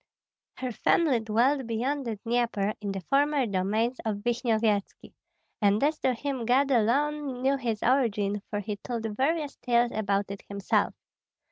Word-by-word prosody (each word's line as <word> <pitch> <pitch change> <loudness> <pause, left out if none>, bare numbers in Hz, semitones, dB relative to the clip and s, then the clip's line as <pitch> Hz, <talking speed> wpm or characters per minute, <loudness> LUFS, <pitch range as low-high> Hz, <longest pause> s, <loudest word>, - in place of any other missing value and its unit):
Her 255 -1 -4
family 275 +2 +2
dwelt 235 +5 +1
beyond 260 +5 -1
the 225 - -2
Dnieper, 230 -2 0
in 200 -1 -3
the 195 -1 -4
former 280 - +2
domains 215 +5 0
of 205 -2 -3
Vishnyevetski; 225 -4 0 0.5
and 205 +3 +3
as 300 +1 +1
to 255 -1 +1
him 270 0 -3
God 270 +3 +3
alone 265 +3 +1
knew 270 +1 +3
his 235 -5 -3
origin, 210 -6 +1
for 205 -1 -2
he 205 0 -4
told 230 +2 -5
various 295 +3 0
tales 240 -1 +2
about 200 -2 -1
it 200 - -7
himself. 200 -1 0
235 Hz, 150 wpm, -28 LUFS, 210-270 Hz, 0.5 s, and